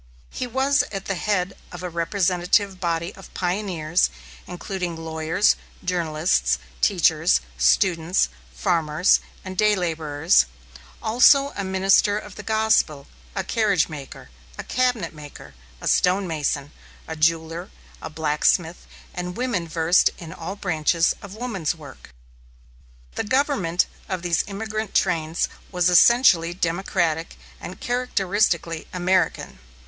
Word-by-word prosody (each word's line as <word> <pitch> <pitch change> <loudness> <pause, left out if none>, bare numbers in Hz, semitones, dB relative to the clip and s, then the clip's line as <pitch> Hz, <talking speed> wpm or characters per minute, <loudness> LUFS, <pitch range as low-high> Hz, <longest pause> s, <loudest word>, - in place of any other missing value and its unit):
He 255 - -4
was 270 +3 +2
at 195 -2 -5
the 195 - -1
head 195 0 -1 0.2
of 180 0 -8
a - - -2
representative 180 +2 +1
body 170 -1 -2
of 195 - -14
pioneers, 180 -3 0 0.4
including 180 -1 -4
lawyers, 160 +4 +1 0.3
journalists, 155 - +1 0.2
teachers, - - +3 0.2
students, 165 - +2 0.2
farmers, 165 -2 +2 0.3
and 185 0 -6
day 210 +2 +3
laborers, 160 - +2 0.6
also 275 +5 +5
a 200 - -3
minister 195 +2 +3
of 210 -2 -8
the 210 - -8
gospel, 220 -10 +1 0.3
a 190 - -1
carriage 200 -5 +1
maker, 140 - -10 0.3
a - - -5
cabinet 250 -10 0
maker, 145 - -12 0.3
a - - -5
stonemason, 160 -6 +1 0.4
a 160 - -5
jeweller, 165 +2 0 0.3
a - - -6
blacksmith, 160 +2 0 0.3
and 180 0 -5
women 235 -9 -1
versed 165 +2 +3
in 165 -1 -9
all 185 +2 -6
branches 165 -3 +1
of 200 -1 -10
woman's 205 -9 -2
work. 145 -4 -13 1.0
The - - -2
government 225 - +1 0.2
of 185 -2 -3
these 170 -2 +1
emigrant 215 +1 -5
trains 160 0 +1 0.2
was 180 -1 +2
essentially 175 -4 +5
democratic 170 -2 -1 0.2
and 180 - -9
characteristically 195 -8 0
American. 185 +1 0
180 Hz, 120 wpm, -23 LUFS, 165-200 Hz, 1.0 s, also